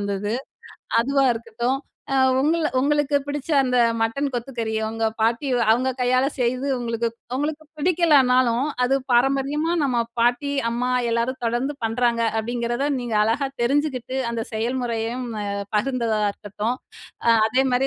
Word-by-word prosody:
வந்தது. 200 +1 -2 0.7
அதுவா 275 +3 +2
இருக்கட்டும். 235 +3 -2 0.3
அ 270 - +3 0.2
உங்கள 315 +3 +2
உங்களுக்கு 290 +1 +2
பிடிச்ச 290 0 -4
அந்த 250 -1 +1 0.2
மட்டன் 275 +5 0
கொத்துக்கறி 235 -2 -3
உங்க 225 0 -3 0.2
பாட்டி 230 +5 +1 0.2
அவங்க 250 +4 +3
கையால 255 +1 +2
செய்து 250 +2 0
உங்களுக்கு 235 -1 -1 0.3
உங்களுக்கு 300 +3 -2
பிடிக்கலனாலும் 270 -7 +3 0.2
அது 255 +2 +2 0.2
பாரம்பரியமா 275 +6 +2
நம்ம 255 -4 +1 0.2
பாட்டி, 245 +4 +2 0.2
அம்மா 240 +2 -1 0.2
எல்லாரும் 235 +3 0
தொடர்ந்து 240 +5 0
பண்றாங்க. 235 +1 +1
அப்படிங்கிறத 240 +3 -1 0.2
நீங்க 240 -2 -4
அழகா 230 +6 +1 0.2
தெரிஞ்சுக்கிட்டு 265 -1 0
அந்த 230 -1 -2
செயல்முறையையும் 235 +1 -2 0.2
அ - - -4 0.3
பகிர்ந்ததா 230 -2 0
இருக்கட்டும். 210 +4 -4 0.5
அ - - +4 0.2
அதேமாதிரி 255 +2 +2
250 Hz, 125 wpm, -23 LUFS, 230-270 Hz, 0.7 s, அ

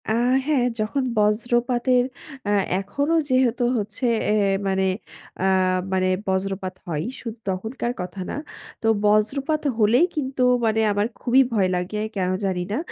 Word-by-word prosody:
আ - - +1 0.4
হ্যাঁ, 280 -5 +2
যখন 220 +6 0
বজ্রপাতের 240 +4 +2 0.4
আ - - 0 0.3
এখনও 285 +11 0
যেহেতু 255 -2 +2
হচ্ছে 215 +4 -3 0.3
এ - - +3 0.3
মানে 190 0 +1 0.6
আ - - 0 0.5
মানে 185 0 +2 0.2
বজ্রপাত 190 0 -1
হয়। 155 -3 -2 0.2
শুধু 230 -1 -6
তখনকার 220 +6 -3
কথা 185 +2 -6
না - - -3 0.5
তো 225 - 0 0.2
বজ্রপাত 270 +9 +2 0.2
হলেই 235 +8 +4
কিন্তু 265 -3 -2 0.2
মানে 220 0 +2
আমার 205 +1 +1
খুবই 255 +2 +4
ভয় 200 -4 +3
লাগে 180 +4 -3 0.2
কেন 185 -2 0 0.2
জানি 185 -2 -1
না। 215 - 0
220 Hz, 140 wpm, -23 LUFS, 195-250 Hz, 0.6 s, হলেই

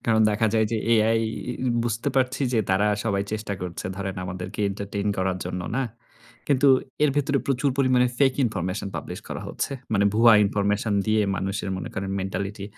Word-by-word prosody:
কারণ 110 -1 +3
দেখা 110 +2 +1
যায় 110 -1 +3
যে - - +1 0.2
AI 115 0 +4 0.6
বুঝতে 115 +3 -1
পারছি। 130 +1 +1
যে 115 - +2
তারা 95 +3 +3 0.2
সবাই 100 -3 +1
চেষ্টা 110 -1 -3
করছে। 90 -1 -5
ধরেন 95 -1 -4
আমাদেরকে 90 +2 -6
এন্টারটেইন 100 0 -4
করার 95 0 0
জন্য 90 - -4 0.2
না। 135 - +1 0.6
কিন্তু 140 0 +4 0.4
এর 145 - +4
ভেতরে 140 -1 +2
প্রচুর 135 +1 +1
পরিমাণে 130 -2 +4
ফেক 135 -2 +4
ইনফরমেশন 100 -2 -2
পাবলিশ - - -6
করা - - -5
হচ্ছে। - - -3 0.2
মানে 100 -2 +3
ভুয়া 115 +1 +7
ইনফরমেশন 105 +1 0
দিয়ে 110 0 +3
মানুষের 95 +1 -3
মনে 95 - -5
করেন 95 0 -3
মেন্টালিটি। 100 +1 -4
105 Hz, 170 wpm, -25 LUFS, 100-120 Hz, 0.6 s, ভুয়া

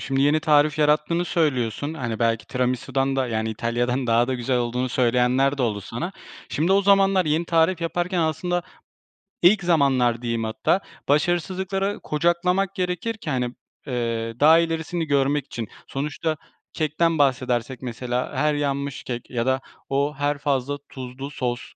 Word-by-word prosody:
Şimdi 135 0 0
yeni 145 +2 +3
tarif 150 -1 +3
yarattığını 155 +3 +2
söylüyorsun, 145 -3 0
hani, 120 -7 -3
belki 115 -1 0
tiramisudan 130 +2 -1
da, 130 -1 +1
yani, 110 -1 -1
İtalya'dan 120 +3 -1
daha 115 +2 +3
da 130 - 0
güzel 125 +1 0
olduğunu 125 +1 -1
söyleyenler 125 +3 +2
de 130 - +1
oldu 105 -4 0
sana. 120 - -5 0.4
Şimdi 165 +6 +1
o 200 +1 +4
zamanlar 195 -2 +4
yeni 155 +3 +1
tarif 165 +1 +2
yaparken 175 +2 -1
aslında 175 +3 0 0.8
-ilk 195 +2 +5
zamanlar 135 -8 +3
diyeyim 115 -2 -2
hatta 110 +11 +1 0.3
başarısızlıkları 185 +6 0
kucaklamak 180 +5 +1
gerekir 180 +5 -2
ki, 220 -8 -7
hani, 125 -3 -1 0.3
eee, 115 -2 -2
daha 160 +3 +7
ilerisini 165 0 -1
görmek 140 -1 +1
için. 115 -6 -6 0.2
Sonuçta 150 +3 -2 0.4
kekten 160 +1 +1
bahsedersek 130 -3 0
mesela 125 0 -3
her 150 0 +2
yanmış 140 -1 -2
kek 120 -2 -6
ya 120 -2 -1
da 130 0 +1 0.3
o, 140 +2 +1
her 145 0 0
fazla 140 -1 -1
tuzlu 130 +2 -7
sos 125 -2 -2
140 Hz, 150 wpm, -23 LUFS, 125-165 Hz, 0.8 s, daha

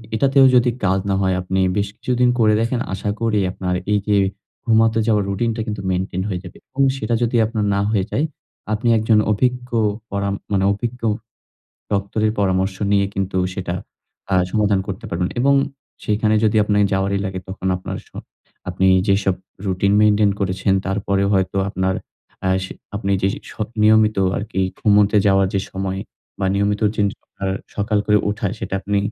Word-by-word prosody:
এটাতেও 135 +3 +5
যদি 120 0 +5 0.2
কাজ 95 +1 +2
না 95 - +2
হয়, 95 -1 +1
আপনি 95 +1 -1 0.2
বেশ 100 -1 +1
কিছুদিন 125 0 +1
করে 110 -2 +4
দেখেন, 120 +2 0
আশা 95 +2 -3
করি 110 -2 +1
আপনার 90 -1 -2 0.2
এই 105 - +3
যে 105 - +3 0.5
ঘুমাতে 115 -1 +3
যাওয়ার 105 -3 +3
রুটিনটা 110 +3 -1
কিন্তু 105 -2 -3
মেইনটেইন 95 0 -2
হয়ে 90 -3 -2
যাবে। 90 - -11
এবং 140 - -2 0.2
সেটা 120 - -2
যদি 120 +1 0
আপনার 110 -1 -2
না 100 - +1
হয়ে 100 -4 +1
যায়, 145 - +1 0.5
আপনি 110 +3 -1
একজন 110 0 +3
অভিজ্ঞ 125 +3 0 0.4
পরাম, 100 0 -1 0.2
মানে 95 -1 +2
অভিজ্ঞ 120 +4 -5 0.9
ডক্টরের 105 +2 0
পরামর্শ 95 0 +1 0.2
নিয়ে 100 -1 +3
কিন্তু 95 -1 -2 0.2
সেটা 90 -2 -4 0.6
আ - - +4 0.2
সমাধান 105 -3 +2
করতে 100 +4 -5
পারবেন। 90 +1 -1
এবং 140 +3 +4 0.5
সেখানে 110 +1 +1
যদি 110 0 +2
আপনের 105 -1 +2
যাওয়ারই 100 +1 0
লাগে, 95 -1 -4
তখন 95 0 -4
আপনার 90 - -6
স - - -24 0.6
আপনি 95 +1 +1 0.2
যেসব 95 -1 +2 0.3
রুটিন 100 +1 +1
মেইনটেইন 105 -1 +4
করেছেন, 95 0 0
তারপরে 100 0 0
হয়তো 95 0 +1
আপনার, 95 -1 -1 0.5
আ - - +2 0.2
সে 95 - -7 0.2
আপনি 100 -1 -2
যে 95 - +3 0.2
স - - -11 0.3
নিয়মিত 110 0 +4 0.2
আরকি 100 -2 -3 0.2
ঘুমুতে 105 0 +4
যাওয়ার 95 -1 +4
যে 100 - +2
সময় 95 0 -3 0.4
বা 95 - 0
নিয়মিত 100 +1 0
চেঞ্জ 100 -1 +2
করার 95 -1 -5 0.2
সকাল 105 +1 0
করে 105 0 +4
উঠা, 105 0 -2
সেটা - - -5
আপনি 100 +1 -1
100 Hz, 165 wpm, -20 LUFS, 95-110 Hz, 0.9 s, এটাতেও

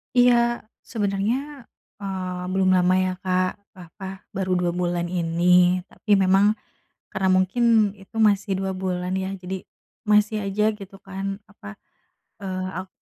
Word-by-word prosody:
Iya 240 -1 +4 0.2
sebenernya, 230 +7 -2 0.4
eee, 185 -2 -4
belum 185 0 +3
lama 180 0 +3
ya 185 0 +1
Kak, 185 0 +1 0.2
apa 190 +1 -9 0.2
baru 190 -1 -1
2 175 -1 +1
bulan 175 -1 -1
ini, 180 +1 +3
tapi 205 -2 +1
memang 195 +2 +4 0.6
karena 190 0 0
mungkin 210 +2 +3
itu 200 +3 -12
masih 205 -2 +2
2 190 0 -2
bulan 185 -1 -2
ya 190 0 -2
jadi 185 +1 -6 0.4
masih 210 +1 +3
aja 195 +2 0 0.2
gitu 195 0 -11
kan 195 0 -5
apa, 195 - -13 0.8
eee, 185 -1 -3 0.2
ak - - -19
190 Hz, 135 wpm, -24 LUFS, 185-205 Hz, 0.8 s, Iya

